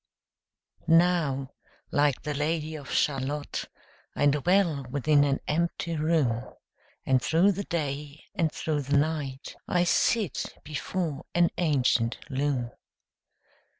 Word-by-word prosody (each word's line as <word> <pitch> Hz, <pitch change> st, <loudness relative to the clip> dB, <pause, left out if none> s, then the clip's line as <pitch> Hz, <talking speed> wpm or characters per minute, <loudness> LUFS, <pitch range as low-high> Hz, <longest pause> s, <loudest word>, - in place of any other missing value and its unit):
Now 165 Hz, -6 st, +3 dB, 0.4 s
like 145 Hz, -2 st, +2 dB
the 150 Hz, -, -2 dB
Lady 155 Hz, +2 st, -1 dB
of 145 Hz, -3 st, -9 dB
Shalott, 145 Hz, +1 st, -1 dB, 0.5 s
I -, -, +1 dB
dwell 150 Hz, +1 st, +2 dB
within 145 Hz, +2 st, +3 dB
an 140 Hz, -1 st, 0 dB
empty 170 Hz, +1 st, -1 dB
room, 150 Hz, -7 st, +1 dB, 0.6 s
And 130 Hz, -1 st, +3 dB
through 170 Hz, +9 st, +3 dB
the 200 Hz, +1 st, -4 dB
day 145 Hz, -2 st, -4 dB
and 165 Hz, -6 st, 0 dB
through 150 Hz, -1 st, -2 dB
the 140 Hz, +1 st, +1 dB
night 145 Hz, -2 st, -2 dB
I 175 Hz, -1 st, +2 dB
sit 200 Hz, +2 st, +1 dB
before 150 Hz, 0 st, -4 dB
an 175 Hz, -1 st, +4 dB
ancient 130 Hz, -8 st, +2 dB
loom. 130 Hz, -3 st, -1 dB
150 Hz, 115 wpm, -27 LUFS, 140-165 Hz, 0.6 s, an